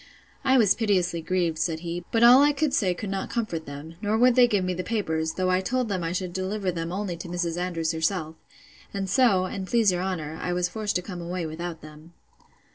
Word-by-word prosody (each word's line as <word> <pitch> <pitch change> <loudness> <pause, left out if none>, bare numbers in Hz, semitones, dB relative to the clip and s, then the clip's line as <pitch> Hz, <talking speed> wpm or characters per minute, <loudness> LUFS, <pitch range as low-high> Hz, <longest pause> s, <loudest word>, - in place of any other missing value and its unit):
—I 265 -1 +4
was 210 -5 +5
piteously 185 -6 0
grieved, 170 -2 -1
said 160 -1 -1
he; 175 0 -4
but 230 0 +3
all 245 +3 +9
I 290 +1 +4
could 285 -1 0
say 195 -10 +2
could 200 +1 -5
not 195 -1 -3
comfort 195 -9 -3
them; 145 +4 -9
nor 215 0 +1
would 250 +2 +5
they 245 0 +6
give 205 -5 +1
me 185 - -1
the 180 +1 -4
papers; 160 -8 -1
though 185 0 0
I 185 0 +2
told 250 +4 -1
them 185 -3 -2
I 165 - -2
should 180 0 -3
deliver 190 +1 -2
them 165 -1 -4
only 190 -1 -3
to 170 - -8
Mrs. 175 -1 -2
Andrews 170 -2 -1
herself. 160 0 -1 0.6
And 195 -1 -2
so, 195 -5 +3
and 190 0 -5
please 225 -3 +3
your 180 0 -1
honour, 160 -5 -4
I 180 - -1
was 180 0 +1
forced 210 +2 -3
to 180 - 0
come 180 -2 -7
away 175 0 -3
without 165 +1 -6
them. 155 +2 -13
185 Hz, 230 wpm, -26 LUFS, 170-210 Hz, 0.6 s, all